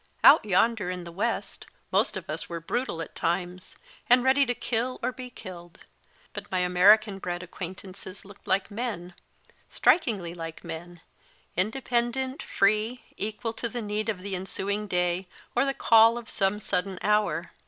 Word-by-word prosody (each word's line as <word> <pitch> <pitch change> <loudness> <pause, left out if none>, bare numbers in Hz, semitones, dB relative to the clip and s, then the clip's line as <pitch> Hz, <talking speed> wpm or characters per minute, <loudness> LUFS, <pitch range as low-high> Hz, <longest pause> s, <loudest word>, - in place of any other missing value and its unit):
Out 305 - +9
yonder, 215 0 +2
in 180 -1 -4
the 170 - -8
W 190 +5 -3
7 235 - +1
est, - - -13 0.3
most - - +2
of - - -8
us - - -4
were 170 -1 -4
brutal 165 -1 -2
at - - -12
times, 180 +2 -2 0.3
and 245 0 +6
ready 270 +1 +4
to 245 - +1
kill, 240 +2 -1
or 250 - +1
be 255 0 -8
killed, 175 -6 -10 0.6
but - - -7
my 185 - +1
American 195 +3 +5
bred 175 -1 -4
acquaintances, 185 +2 -8
looked 200 0 -15
like 190 +2 +1
men, 205 -6 -4 0.6
strikingly 210 - +2
like 165 -2 -7
men, 175 +1 -8 0.5
independent, 240 +5 0
free, 215 +5 +1
equal 220 +2 -3
to 235 - -3
the 245 - -4
need 210 +1 -2
of 190 -4 -3
the 200 -1 -4
ensuing 200 +3 -2
day 180 0 0 0.3
or 245 +3 +4
the 275 - +1
call 225 +1 +6
of 235 -1 -7
some 195 0 +1
sudden 190 -1 -1
hour. 205 -6 +1
200 Hz, 165 wpm, -27 LUFS, 180-235 Hz, 0.6 s, Out